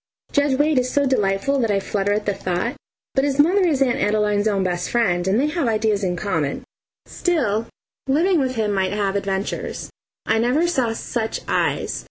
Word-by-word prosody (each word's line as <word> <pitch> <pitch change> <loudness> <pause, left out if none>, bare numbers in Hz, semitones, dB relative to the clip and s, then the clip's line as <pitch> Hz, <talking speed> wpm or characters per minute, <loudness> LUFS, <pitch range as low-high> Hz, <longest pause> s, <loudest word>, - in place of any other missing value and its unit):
Judge 285 -2 +2
Wade 295 -1 +3
is 250 0 -1
so 285 -1 +2
delightful 260 +2 +1
that 230 -3 +1
I 200 -1 +2
flutter 200 0 -1
at 210 +1 0
the 205 - +1
thought, 180 -2 -2 0.4
but 270 - +2
his 280 -1 0
mother 345 +7 +4
is 280 -5 +2
Aunt 260 +1 0
Adeline's 210 -1 +1
own 200 -3 +1
best 180 -1 -2
friend, 185 -7 +1
and 200 +4 +2
they 280 - +2
have 300 -3 -1
ideas 215 -2 +1
in 180 -2 0
common. 165 -7 -2 0.4
Still, 240 - 0 0.4
living 330 +6 +3
with 260 -2 -1
him 215 -2 0
might 190 -1 0
have 200 -1 -1
adventures. 195 0 -3 0.3
I 220 0 +2
never 250 +8 +2
saw 255 -9 0
such 225 0 -3
eyes! - - 0
220 Hz, 190 wpm, -21 LUFS, 200-275 Hz, 0.4 s, mother